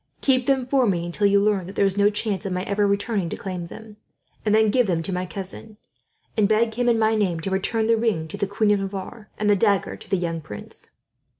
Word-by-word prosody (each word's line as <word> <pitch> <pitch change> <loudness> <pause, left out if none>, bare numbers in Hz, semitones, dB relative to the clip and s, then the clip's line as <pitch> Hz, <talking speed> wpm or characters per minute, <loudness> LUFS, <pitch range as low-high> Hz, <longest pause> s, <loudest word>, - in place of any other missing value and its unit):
Keep 255 -2 +2
them 265 -2 +2
for 260 -1 +2
me, 175 -4 0
until 190 +4 +1
you 200 0 +4
learn 200 -3 +1
that 195 - -9
there 200 - +3
is 195 -1 +1
no 205 0 +4
chance 210 -1 -2
of 195 - -4
my 180 0 -2
ever 205 +1 +1
returning 200 -2 0
to - - -5
claim 185 -3 -5
them; 215 +4 -11 0.5
and 210 -1 +2
then 220 -1 +4
give 245 -1 +3
them 165 -3 0
to 190 - -2
my 180 0 -2
cousin, 200 +3 -6 0.6
and 210 -2 +3
beg 220 +1 +2
him 245 +1 +1
in 235 - +3
my 220 0 +3
name 195 -6 0
to 195 - -3
return 220 +4 0
the 230 +1 +4
ring 220 -9 0
to - - -7
the 200 - -1
Queen 205 +1 +1
of 205 - +3
Navarre, 195 +3 -6
and 210 - -1
the 205 - +5
dagger 200 -1 +1
to - - -15
the 195 - +2
young 165 -2 -2
prince." 105 -9 -9
205 Hz, 255 wpm, -23 LUFS, 190-220 Hz, 0.6 s, the